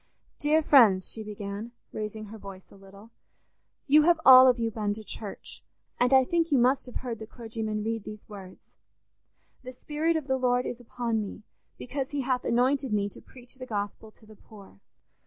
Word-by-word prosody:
"Dear 310 +2 +2
friends," 215 -11 +5
she 225 - -5
began, 210 +2 -7 0.2
raising 215 0 -5
her 220 - -10
voice 195 -1 -12
a - - -15
little, 200 +3 -16 0.7
"you 300 +1 +6
have 340 +1 +3
all 260 0 +10
of 250 -1 +4
you 230 -1 -1
been 210 -1 -2
to 220 +1 -9
church, 210 -1 -8 0.4
and 245 +1 +2
I 265 -1 +6
think 335 +2 0
you 280 - +4
must 255 +2 +2
have 250 - -11
heard 235 -3 -4
the 220 - -8
clergyman 220 -2 -5
read 225 -1 -3
these 210 0 -10
words: 195 -3 -12 0.9
'The 255 -1 -9
Spirit 310 +5 -1
of 315 -3 -2
the 265 -1 0
Lord 250 -1 +1
is 245 - -5
upon 235 -2 -3
me, 210 +1 -8 0.3
because 265 +1 -5
he 285 -1 -3
hath 255 -1 -1
anointed 260 +2 +1
me 205 -1 0
to - - -14
preach 245 -1 -15
the 255 -1 -9
gospel 205 0 -5
to 215 - -23
the 215 0 -15
poor. 200 - -16
230 Hz, 195 wpm, -27 LUFS, 210-260 Hz, 0.9 s, all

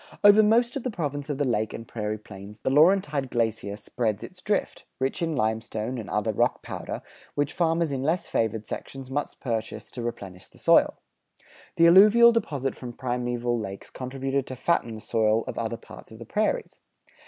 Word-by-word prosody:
Over 205 +1 +8
most 235 +4 +3
of 275 - -2
the 255 - -2
Province 145 - -4
of 145 - -2
the 145 -1 0
Lake 110 -3 0
and 115 - -8
Prairie 105 -1 -3
Plains 105 0 -12
the - - 0
Laurentide 150 -3 +4
glacier 110 -4 -1
spread 110 0 -2
its 185 0 -10
drift, 205 +1 -1
rich 135 +4 -1
in 165 -2 0
limestone 110 +1 -2
and 110 - -7
other 105 +1 0
rock - - +1
powder, - - -6 0.3
which 145 0 0
farmers 165 -2 +1
in 135 -2 -2
less 160 +6 0
favored 110 -1 -1
sections 135 +3 -7
must 145 +2 -3
purchase 115 -3 -4
to 125 - -6
replenish 95 -5 -6
the - - -22
soil. - - +4 0.8
The 170 - +5
alluvial 210 +7 +8
deposit 145 - -1
from 120 -2 -8
primeval 120 -1 -1
lakes 100 -2 -7
contributed 135 +1 -3
to 130 - -6
fatten 125 -4 0
the 110 - -9
soil 110 0 +2
of - - -5
other 115 0 -2
parts 115 - -13
of 110 - -11
the 115 - -9
prairies. 215 - -1
130 Hz, 185 wpm, -26 LUFS, 110-160 Hz, 0.8 s, Over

